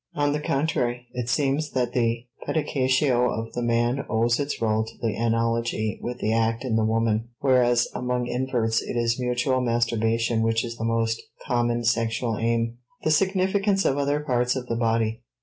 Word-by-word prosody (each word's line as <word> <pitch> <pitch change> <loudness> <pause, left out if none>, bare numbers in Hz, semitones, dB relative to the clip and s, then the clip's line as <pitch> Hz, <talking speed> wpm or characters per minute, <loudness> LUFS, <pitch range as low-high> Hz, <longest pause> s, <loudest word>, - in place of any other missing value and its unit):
On 145 0 +1
the 150 - -1
contrary, 125 -5 -1
it 125 -1 -3
seems 145 +3 0
that 125 -2 0
the 115 -1 0 0.2
pedicatio 130 -4 +2
of 115 0 -4
the 120 - -2
man 120 +3 +1
owes 115 +3 +2
its 145 0 -2
rôle 110 -1 +1
to - - -12
the 115 -3 -1
analogy 115 -1 0
with 125 0 -4
the 110 -2 0
act 115 +1 +1
in 120 -3 0
the 110 - +2
woman, 115 0 +1
whereas 120 -3 +3
among 125 0 -1
inverts 120 -3 0
it - - -4
is 120 +1 +1
mutual 125 +1 0
masturbation 115 -1 +1
which 115 +1 +1
is 115 0 -6
the 115 - -5
most 115 0 0 0.2
common 120 -1 0
sexual 115 0 0
aim. 115 +1 0 0.2
*The 155 - +2
Significance 195 +3 +2
of 135 - +2
Other 145 +1 +1
Parts 125 -3 +1
of 130 -1 -4
the 115 - -2
Body. 115 0 0
120 Hz, 175 wpm, -25 LUFS, 115-130 Hz, 0.2 s, whereas